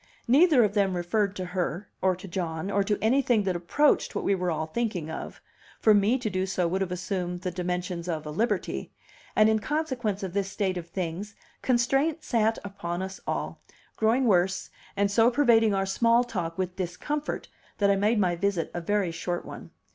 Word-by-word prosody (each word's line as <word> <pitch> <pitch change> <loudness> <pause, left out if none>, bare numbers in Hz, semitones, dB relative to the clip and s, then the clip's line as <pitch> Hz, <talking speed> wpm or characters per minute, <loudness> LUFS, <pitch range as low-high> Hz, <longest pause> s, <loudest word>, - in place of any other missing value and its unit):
Neither 285 +1 +6
of 205 -2 +1
them 195 -3 +2
referred 200 +3 0
to 185 - -4
her, 180 +1 -3
or 185 -1 +3
to 185 +2 -10
John, 170 0 -3
or 200 0 +2
to 205 +1 0
anything 240 -2 +3
that 185 -2 -1
approached 230 - +2
what - - -1
we 200 - +2
were 180 -2 -1
all 160 -1 -1
thinking 175 -3 -3
of; - - -7 0.4
for 215 - +5
me 205 +5 +3
to 245 - -3
do 185 -2 -1
so 185 -2 0
would 190 +3 -1
have 185 -2 -1
assumed 180 -1 -3
the 185 -1 -2
dimensions 180 0 -3
of 155 -2 -3
a 150 - -5
liberty; 225 +10 -1 0.4
and 215 - +6
in 220 0 +3
consequence 250 -8 -2
of 185 -2 -4
this 195 -1 -1
state 190 -3 -1
of 170 -1 -6
things, 185 +4 -4 0.3
constraint 270 +6 +1
sat 225 -1 +1
upon 185 -3 -4
us 190 0 -6
all, - - -3 0.3
growing 230 +4 +2
worse, 190 -3 +2 0.3
and 200 0 +2
so 225 +3 +5
pervading 235 -5 +4
our 195 0 +1
small 230 +5 +3
talk 175 -9 -4
with 185 -1 -2
discomfort 195 - -3 0.3
that 200 -1 +3
I - - +4
made 210 +4 +2
my 180 -4 +2
visit 190 -2 -1
a 175 - -3
very 200 0 0
short 175 +1 -3
one. - - -9
195 Hz, 195 wpm, -27 LUFS, 180-225 Hz, 0.4 s, Neither